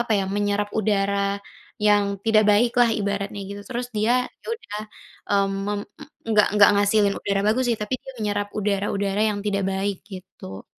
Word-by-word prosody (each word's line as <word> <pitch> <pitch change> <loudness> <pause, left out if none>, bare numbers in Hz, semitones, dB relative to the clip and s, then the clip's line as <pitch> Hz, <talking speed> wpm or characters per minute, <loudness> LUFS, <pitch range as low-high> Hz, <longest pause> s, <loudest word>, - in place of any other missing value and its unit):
apa 240 -2 0
ya, 195 - 0
menyerap 205 0 0
udara, 200 -1 +1 0.5
yang 205 -1 +5 0.2
tidak 220 -1 +4
baik 230 +4 +3
lah 240 -1 +5
ibaratnya 200 -1 -2
gitu 200 0 -7
terus 245 0 -3
dia 215 +3 +2 0.3
ya - - -17
udah, 210 - -7 0.5
mmm, 200 -1 +2
mem 205 0 -1 0.5
enggak 215 -2 +4
enggak 205 -1 +7
ngehasilin 205 0 +3
udara 200 -1 0
bagus 235 +5 +2
sih, 225 - -3
tapi 210 +4 -2
dia 265 - -9
menyerap 205 -1 -1
udara-udara 200 0 -1
yang 205 - -4
tidak 200 -1 0
baik, 195 +1 -1 0.2
gitu. 185 - -10
205 Hz, 165 wpm, -23 LUFS, 200-210 Hz, 0.5 s, enggak